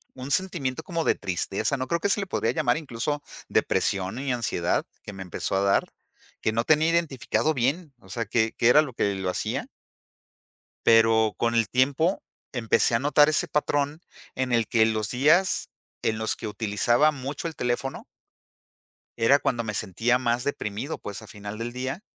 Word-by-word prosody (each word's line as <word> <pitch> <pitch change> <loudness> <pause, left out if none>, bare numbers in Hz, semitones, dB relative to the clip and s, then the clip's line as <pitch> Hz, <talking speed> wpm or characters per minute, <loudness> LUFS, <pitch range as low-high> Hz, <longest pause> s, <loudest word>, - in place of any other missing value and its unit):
un 130 +2 -7
sentimiento 165 -9 -1
como 170 -3 -2
de - - +3
tristeza, 100 +7 -1
no 130 0 -3
creo 170 +3 0
que 200 - 0
se 205 - +2
le 195 - -2
podría 115 -10 -1
llamar 130 -1 +1
incluso 145 0 -3 0.3
depresión 95 +3 0
y 135 -1 -2
ansiedad 100 -7 0 0.2
que 105 - -8
me 95 - -9
empezó 95 +1 -3
a 95 - +2
dar, 100 0 +1 0.5
que 110 - +1
no 115 +1 0
tenía 155 +3 +3
identificado 155 -1 0
bien, 140 +4 -1
o - - -19
sea, 115 -1 -3
qué 110 +1 +1
qué 115 - +4
era 150 +5 +7
lo 135 -6 -5
que 100 -3 0
lo 95 -1 -2
hacía - - -2 1.2
pero 115 -1 +5
con 115 0 +1
el 115 -2 +3
tiempo 140 - +1 0.3
empecé 115 -1 +2
a 115 - +3
notar 145 +1 +4
ese 155 - +1
patrón, 145 +1 -1 0.3
en 130 -1 -1
el 115 -2 +2
que 110 -2 +4
los 110 -1 -1
días 155 +9 +3 0.3
en 110 0 0
los 110 - -1
que 110 - -6
utilizaba 115 +7 +2
mucho 140 +4 -5
el 160 - -7
teléfono 125 +2 -2 1.1
era 130 +5 +4
cuando 120 -2 -1
me 105 -1 -4
sentía 115 +7 0
más 120 0 0
deprimido, 125 0 -3
pues, 100 +1 -7
a 110 - -12
final 105 +1 -8
del 115 +1 -4
día 130 +8 -4
120 Hz, 180 wpm, -26 LUFS, 110-145 Hz, 1.2 s, era